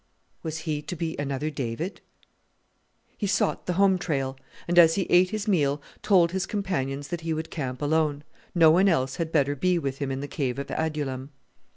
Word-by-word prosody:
Was 160 0 -4
he 150 -2 -1
to 180 - -6
be 165 -1 -3
another 145 +2 -2
David? 140 - -4 1.2
He 205 - 0
sought 195 - 0
the 180 - +1
home 190 0 +4
trail; 135 -6 -2 0.3
and 175 0 +4
as 165 -1 +7
he 195 - +1
ate 180 +1 +6
his 215 +1 -3
meal 145 -7 +2 0.2
told 175 -5 +4
his 190 +1 -2
companions 145 -9 -2
that 175 -1 -3
he 165 -1 -2
would 160 +1 -5
camp 130 -3 -4
alone; 150 -1 +1 0.3
no 165 -2 +7
one 190 +4 +5
else 130 -6 0
had 165 -2 -2
better 145 -2 +2
be 180 +5 +2
with 135 -4 -3
him 140 -2 -2
in 135 - -2
the 145 - -4
Cave 135 -3 -2
of 140 - -5
Adullam. 145 -4 -2
160 Hz, 195 wpm, -26 LUFS, 140-175 Hz, 1.2 s, as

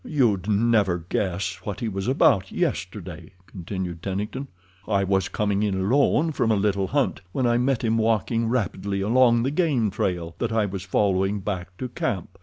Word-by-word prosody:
"You'd 110 - +1
never 100 -5 +2
guess 95 -1 -1
what 105 - -5
he 115 - -2
was 95 0 -3
about 125 -7 +3
yesterday," - - -4
continued 90 -2 -6
Tennington. 105 +9 -4 0.4
"I 100 -2 +2
was 95 -1 +1
coming 100 -1 0
in 105 -2 0
alone 140 +9 +2
from 120 -6 0
a - - +4
little 100 -1 +1
hunt 140 +2 0
when 130 - 0
I 120 0 +3
met 125 -1 +1
him 115 0 +1
walking 115 +1 +1
rapidly 100 -4 -1
along 120 +2 +4
the 135 - 0
game 145 - +1
trail 85 -3 -2
that 120 -1 -1
I 110 -2 +2
was 95 -1 -4
following 95 +1 +1
back 95 -2 -5
to 130 - -4
camp. 120 - -4
105 Hz, 175 wpm, -24 LUFS, 95-120 Hz, 0.4 s, a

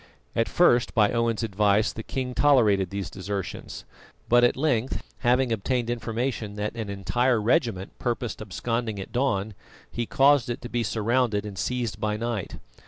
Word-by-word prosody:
At 115 - +1
first, 125 -9 +3
by 105 -3 +4
Owen's 115 -1 0
advice, 105 0 +2
the 115 - -6
king 125 +2 -4
tolerated 110 -10 +4
these 100 -1 -4
desertions; 100 -1 -6 0.4
but 120 +1 +5
at 120 - +3
length, 130 -4 0 0.2
having 125 0 +2
obtained 120 +2 -1
information 115 -2 -3
that 105 0 -3
an 110 -3 -4
entire 110 +6 +1
regiment 105 -3 0
purposed 120 -3 -3
absconding 110 +1 -3
at 95 - -7
dawn, 110 -5 0 0.4
he 120 -1 -3
caused 140 -3 +4
it 120 - -3
to 120 - -6
be 120 - -1
surrounded 115 0 0
and 105 -2 -7
seized 120 -4 -2
by 105 0 -1
night. 115 -3 -3
115 Hz, 160 wpm, -26 LUFS, 105-120 Hz, 0.4 s, but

